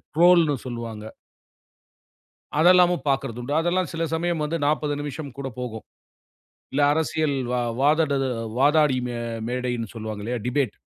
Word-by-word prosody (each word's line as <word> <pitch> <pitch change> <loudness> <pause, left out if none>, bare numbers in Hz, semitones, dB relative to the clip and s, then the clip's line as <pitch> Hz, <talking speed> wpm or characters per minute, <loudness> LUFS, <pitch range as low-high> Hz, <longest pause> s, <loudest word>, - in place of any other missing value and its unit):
ட்ரோல்ன்னு 170 -3 +5
சொல்லுவாங்க. 115 -3 -6 1.6
அதெல்லாமும் 180 +1 +5
பார்க்கிறதுண்டு. 135 0 -2
அதெல்லாம் 175 0 0
சில 165 0 -2
சமயம் 165 -1 0
வந்து 165 +2 -2
40 150 0 0
நிமிஷம் 145 -1 -6
கூடப் 135 -4 -6
போகும். 110 -3 -6 0.9
இல்ல 140 +2 0
அரசியல் 155 -2 0 0.2
வா 125 - 0 0.2
வாதட 150 +1 +3 0.5
வாதாடி 145 -1 +4
மே 120 -1 -4 0.3
மேடைன்னு 125 -2 -2
சொல்லுவாங்களே 110 +1 -4
டிபேட். 130 +1 0
145 Hz, 115 wpm, -24 LUFS, 125-160 Hz, 1.6 s, ட்ரோல்ன்னு